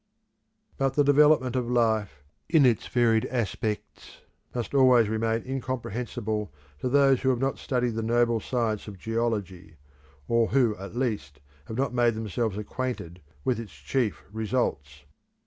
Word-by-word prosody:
But 135 -1 +1
the 145 - +4
development 145 -3 +4
of 125 -2 -1
life, 110 -10 +1 0.3
in 160 -4 +5
its 120 -5 +2
varied 115 -2 +2
aspects, 110 -2 -4 0.3
must 120 0 -3
always 130 -4 +5
remain 110 +1 -1
incomprehensible 120 - -3 0.3
to 125 - -1
those 135 -1 +4
who 130 - +2
have 130 - +2
not 135 +2 -1
studied 125 -2 -1
the 115 - -2
noble 120 0 +2
science 110 -3 -2
of 100 -2 -8
geology, 100 -6 -3 0.5
or 115 -1 +3
who 120 -5 +2
at 100 +2 -9
least 105 - -2 0.3
have 110 - -6
not 135 -1 0
made 120 -2 +2
themselves 110 -1 -2
acquainted 105 -6 -5 0.2
with 125 -3 +1
its 110 -7 -8
chief 105 - -2
results. 100 - -2
115 Hz, 145 wpm, -27 LUFS, 105-130 Hz, 0.5 s, in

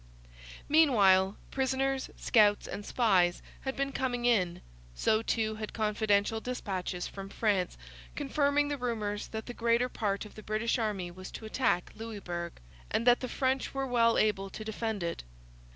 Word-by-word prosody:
Meanwhile, 205 -11 +5
prisoners, 265 0 0
scouts, 210 -3 +4
and 205 - -5
spies 190 -7 +2 0.2
had 265 0 -4
been 275 0 -1
coming 245 -3 -1
in; 185 -8 +2 0.3
so 215 - +2
too 220 -1 0
had 215 -1 -6
confidential 215 0 +1
dispatches 190 -7 -3
from 195 0 -7
France 200 -4 0 0.4
confirming 290 0 +1
the 290 -1 -3
rumours 215 -4 -2
that 220 -1 -6
the 245 - -6
greater 235 +1 +2
part 200 -3 -2
of 210 - -12
the 215 - -10
British 215 +3 0
army 200 -6 -2
was 185 +1 -9
to 220 - -8
attack 215 -6 0
Louisbourg, 180 -6 -5 0.4
and 230 - 0
that 245 0 +6
the 255 - -4
French 265 +1 -1
were 270 0 0
well 235 -2 +3
able 195 -2 +1
to 215 - -8
defend 220 -2 -3
it. 170 0 -3
220 Hz, 155 wpm, -30 LUFS, 200-250 Hz, 0.4 s, that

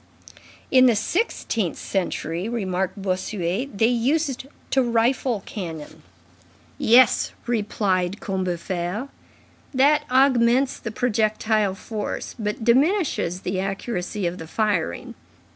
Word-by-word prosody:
"In 255 -1 +7
the 235 - +4
sixteenth 225 - -1
century," 175 0 -2
remarked 190 -4 -2
Bossuet, 190 +4 -2
"they 220 - +4
used 265 +3 0 0.2
to 270 - +4
rifle 235 -1 +1
cannon." 165 -7 -7 0.8
"Yes," 240 0 +5
replied 205 -4 0
Combeferre, 185 +4 -3 0.7
"that 295 +3 +4
augments 255 0 +3
the 230 - -5
projectile 215 -3 +1
force, 210 +1 -5
but 210 +2 -3
diminishes 260 - +2
the 185 0 -2
accuracy 195 0 -3
of 175 +1 -2
the 160 - -8
firing. 200 - -1
215 Hz, 100 wpm, -23 LUFS, 185-245 Hz, 0.8 s, In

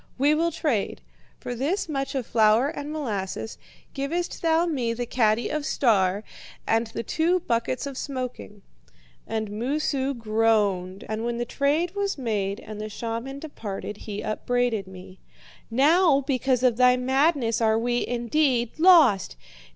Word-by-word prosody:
We 285 +3 +4
will 335 +2 +1
trade. 285 - -1 0.4
For 245 - -5
this 295 - -1
much 275 -3 -3
of 260 -3 -1
flour 225 +4 +3
and 295 -1 -6
molasses 220 -8 -4 0.3
givest 320 +6 -3
thou 330 0 +3
me 255 -9 -1
the 245 +1 -3
caddy 230 -1 +1
of 305 -1 -2
"Star" 205 -8 +2 0.4
and 225 +1 +1
the 225 +1 -5
two 340 - +1
buckets 235 0 -1
of 280 -1 -6
smoking.' 250 -7 -6 0.6
"And 220 -2 -3
Moosu 270 +4 -1
groaned, 215 -3 0
and 220 +1 -3
when 235 0 -2
the 240 - -2
trade 300 +8 0
was 400 -3 -2
made 205 -6 -2
and 210 0 -8
the 215 - -5
shaman 230 +5 -5
departed, 210 -9 -6
he 210 -1 -6
upbraided 225 -1 -1
me: 185 0 -12 0.5
'Now, 285 +4 +4
because 260 -2 0
of 245 -3 +3
thy 250 0 +5
madness 265 -2 +1
are 220 -1 +3
we, 240 +1 0
indeed, 245 +1 0
lost! 310 - +5
245 Hz, 145 wpm, -25 LUFS, 220-285 Hz, 0.6 s, thy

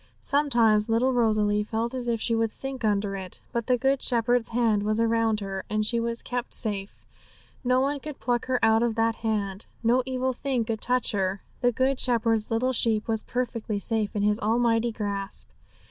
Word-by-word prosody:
Sometimes 235 -7 +3
little 245 +4 +2
Rosalie 215 -3 +2
felt 225 +3 -2
as 250 -2 -4
if 230 -1 0
she 230 - -1
would 225 -1 +1
sink 270 0 -6
under 205 -2 +1
it; 190 -2 -7
but 235 -2 -2
the 250 - +3
Good 270 +2 +1
Shepherd's 240 0 +2
hand 225 -3 +2
was 215 +2 0
around 225 -1 +2
her, 195 -1 -4
and 215 0 0
she 235 +2 +1
was 230 0 -2
kept 245 0 -4
safe; 200 -3 -2 0.6
no 255 +1 +3
one 280 +1 0
could 300 0 -8
pluck 240 +1 -1
her 260 -1 +2
out 220 0 +4
of 235 -2 +1
that 225 0 +1
hand. 205 -3 -2 0.2
No 240 +3 +4
evil 260 0 -1
thing 250 -2 -1
could 220 -1 -3
touch 250 0 +1
her; 195 -2 -1 0.2
the 245 -1 +3
Good 260 +2 +1
Shepherd's 230 -3 +2
little 250 +3 +1
sheep 225 -3 +1
was 220 -1 0
perfectly 230 -4 -3
safe 215 +1 -1
in 205 - 0
His 210 +1 +2
almighty 230 +1 +2
grasp. 200 -3 -4
230 Hz, 190 wpm, -26 LUFS, 215-245 Hz, 0.6 s, out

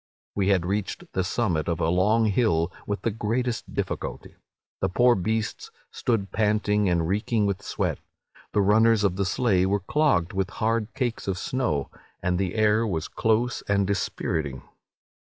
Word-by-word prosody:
"We 100 -1 0
had 95 -4 +3
reached 100 +1 -2
the 95 - +1
summit 90 -6 0
of 85 -1 -1
a 80 - +1
long 105 +6 +3
hill 95 -6 +1
with 100 0 -3
the 115 - +1
greatest 115 +3 -2
difficulty. - - -4 0.5
The 95 - 0
poor 120 +6 +4
beasts 110 +2 -2 0.2
stood 105 -5 -1
panting 105 -2 +1
and 85 -2 +1
reeking 105 +3 +1
with 100 0 -1
sweat; - - -2 0.5
the 105 - +2
runners 110 +2 +4
of 95 -3 +2
the 100 0 0
sleigh 95 -3 +2
were 100 +1 +1
clogged 95 - +1
with 95 0 -1
hard 110 -1 0
cakes 120 -6 -2
of 95 -2 -1
snow, 90 - -1 0.3
and 90 0 0
the 95 0 -1
air 110 +1 +3
was 80 -6 -2
close 115 +2 0
and 100 -1 +3
dispiriting. 80 -8 -2
100 Hz, 160 wpm, -25 LUFS, 90-110 Hz, 0.5 s, poor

